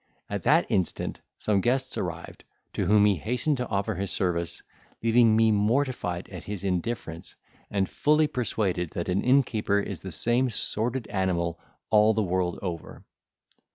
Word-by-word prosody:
At - - -2
that - - +5
instant 95 -3 -1 0.2
some 100 -2 +1
guests 130 +4 0
arrived, - - -5 0.3
to - - -1
whom 105 +1 +5
he 100 -3 +3
hastened 125 - 0
to 125 -1 -3
offer 100 +1 -1
his 95 +1 -3
service, 85 -4 -2 0.4
leaving 115 -1 +5
me 110 0 +4
mortified 105 -4 0
at 90 -5 -9
his 100 -2 -5
indifference, 90 -3 -3 0.3
and 100 -2 0
fully 155 +1 +3
persuaded 100 - -1
that 85 +1 -3
an 90 +2 +1
innkeeper 120 -6 +2
is 100 -4 -5
the 95 - -7
same 120 +9 +2
sordid 115 +2 -1
animal 85 -3 -1 0.3
all 105 0 +5
the 110 - +2
world 90 -2 -1
over. 85 -4 -6
105 Hz, 155 wpm, -27 LUFS, 90-120 Hz, 0.4 s, that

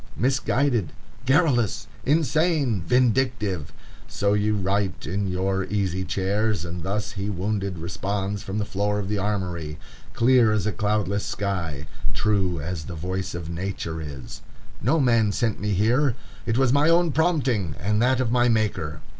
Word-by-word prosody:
"Misguided"! 130 - +1 0.3
"Garrulous"! 135 - +3 0.2
"Insane"! 150 - +2
"Vindictive"! 115 - +1 0.4
So 100 0 0
ye 105 +1 +2
write 100 -2 0
in 100 +4 -1
your 95 +1 0
easy 95 -3 -1
chairs, 95 +1 0
and 85 0 -5
thus 100 +5 -2
he 100 0 -3
wounded 100 -1 -2
responds 95 +4 -3
from 95 +2 -4
the 105 - 0
floor 105 +1 -1
of 100 -2 -3
the 105 -1 0
Armory, 90 -6 -2 0.4
clear 120 -2 +4
as 105 -2 0
a 105 - +1
cloudless 105 -1 0
sky, 85 -8 -3 0.3
true 95 -5 +1
as 80 0 -4
the 90 - -6
voice 95 +3 -3
of 85 -2 -5
nature 85 -2 -4
is: 70 -4 -8 0.4
"No 165 - +2
man 115 -6 +3
sent 110 +1 0
me 105 +1 -1
here; 120 +7 +2 0.3
it 115 0 +1
was 135 -1 +3
my 145 +3 +4
own 170 -1 +4
prompting 135 - +1
and 105 +3 +1
that 130 +1 +3
of 125 -3 0
my 120 0 +4
Maker. 105 -9 0
105 Hz, 155 wpm, -24 LUFS, 95-120 Hz, 0.4 s, clear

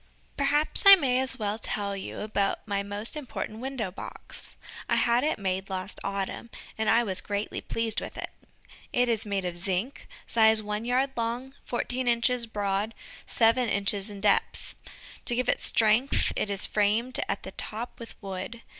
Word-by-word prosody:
Perhaps 290 +2 +4
I 395 - +14
may 260 -8 +1
as 265 0 -1
well 210 -1 -2
tell 200 -2 -2
you 195 - -6
about 205 -1 -1
my 200 -1 0
most 205 +5 0
important 255 -6 -5
window 250 -6 -3
box. 190 - -8 0.3
I - - +3
had 235 +2 +3
it 310 - +1
made 190 0 -2
last 185 -1 -3
autumn, 200 +3 -3 0.3
and 220 -1 0
I 235 +2 +5
was 190 -5 -1
greatly 205 +1 -3
pleased 230 -1 -2
with - - -8
it. - - -5 0.6
It 245 0 +2
is 225 -2 -1
made 195 -2 -1
of 175 -1 -3
zinc, 190 +8 -2 0.2
size 220 -1 +5
one 210 +1 -4
yard 255 +3 +1
long, 240 +3 -3
fourteen 245 +1 -2
inches 240 0 +2
broad, 205 0 -2 0.3
seven 230 +1 +3
inches 200 0 0
in 200 -1 -9
depth. 205 -1 +1 0.5
To 240 - +2
give 250 +1 0
it - - +1
strength 225 +5 +2
it 210 - -1
is 200 -1 +1
framed 220 +5 +1
at 195 - -2
the 190 - -7
top 225 +5 -4
with 230 - -11
wood. 195 +4 -6
220 Hz, 170 wpm, -27 LUFS, 200-245 Hz, 0.6 s, I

